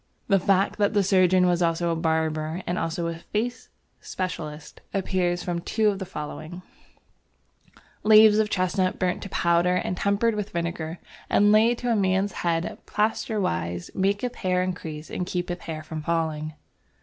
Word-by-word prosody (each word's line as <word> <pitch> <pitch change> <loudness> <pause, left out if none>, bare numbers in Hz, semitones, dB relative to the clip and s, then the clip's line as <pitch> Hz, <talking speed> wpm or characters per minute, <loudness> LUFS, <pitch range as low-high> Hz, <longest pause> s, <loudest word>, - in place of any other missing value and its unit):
The 195 -1 +5
fact 195 +2 +1
that 205 +1 +2
the 205 - +4
surgeon 185 -1 +4
was 175 -1 +2
also 170 0 +1
a - - 0
barber, 160 +1 -1
and 175 - -1
also 165 +1 -2
a 165 0 -3
"face 235 +7 -3 0.3
specialist," 160 -5 -6
appears 180 -2 0
from 175 -1 -2
the 170 - -6
two 215 -2 +1
following: 175 -1 -7 1.4
"Leaves 215 0 +7
of 215 -1 +2
Chestnut 185 -1 0
burnt 180 -1 -1
to 200 - -7
powder 170 +1 +2
and 180 0 -1
tempered 200 +5 +1
with 210 -1 -3
Vinegar 170 -1 -3 0.3
and 205 +1 +4
laid 225 +3 +4
to 245 0 -1
a - - +3
man's 195 0 +1
Head 170 -1 -2
plaisterwise 185 - -1
maketh 200 +6 0
Hair 180 -1 +1
increase 160 -4 -5
and - - -2
keepeth 175 0 -3
hair 155 -1 -6
from 155 0 -6
falling." 155 -1 -2
180 Hz, 155 wpm, -25 LUFS, 165-200 Hz, 1.4 s, Leaves